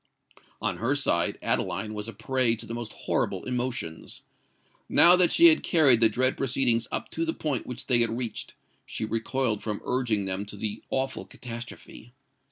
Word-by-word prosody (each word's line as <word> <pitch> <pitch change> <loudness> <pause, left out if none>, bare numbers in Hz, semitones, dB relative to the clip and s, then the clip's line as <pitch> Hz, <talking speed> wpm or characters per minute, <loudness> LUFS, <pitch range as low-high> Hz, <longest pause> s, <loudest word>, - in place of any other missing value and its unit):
On - - -1
her 130 +6 0
side, 85 -11 +1
Adeline 105 +3 -1
was 105 0 -5
a 115 - -7
prey 120 +2 +1
to 115 - -8
the 115 - -7
most 115 -2 -5
horrible - - -2
emotions. 120 -10 -4 0.7
Now 175 - +7
that 180 -2 +3
she 340 0 +8
had 315 - +3
carried 145 -9 +4
the 115 - +6
dread 130 +4 +2
proceedings 125 -3 +1
up - - -4
to 165 - -2
the 160 0 -2
point 145 -6 -3
which 125 0 -5
they 125 -3 +4
had 115 0 +1
reached, 125 -2 -5 0.3
she 110 - -5
recoiled 115 0 -1
from 105 -2 -4
urging 120 -6 -1
them 95 +1 -2
to 105 - -8
the 105 +1 -5
awful 130 0 -2
catastrophe. 120 0 -10
120 Hz, 175 wpm, -26 LUFS, 110-130 Hz, 0.7 s, she